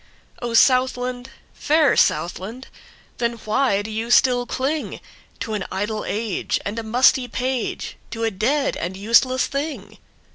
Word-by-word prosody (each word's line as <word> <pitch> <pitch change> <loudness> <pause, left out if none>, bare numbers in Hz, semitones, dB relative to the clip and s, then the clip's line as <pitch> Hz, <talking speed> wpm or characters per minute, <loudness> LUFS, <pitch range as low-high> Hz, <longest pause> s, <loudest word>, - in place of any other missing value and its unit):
O 240 -1 -2
Southland, 255 0 +2 0.2
fair 305 -2 +3
Southland! 190 +10 0 0.5
Then 235 -1 0
why 215 -2 +1
do 220 - -7
you 225 +2 -3
still 245 0 +4
clingTo 290 +4 -2 0.6
an 205 - -2
idle 210 +3 -3
age 215 -2 -2
and 210 +3 -3
a - - -5
musty 245 +3 +3
page, 255 0 -3
To 230 -1 -5
a 225 - +1
dead 265 +9 0
and 180 +2 -4
useless 235 +5 +3
thing? 290 +2 -5
240 Hz, 135 wpm, -22 LUFS, 215-260 Hz, 0.6 s, still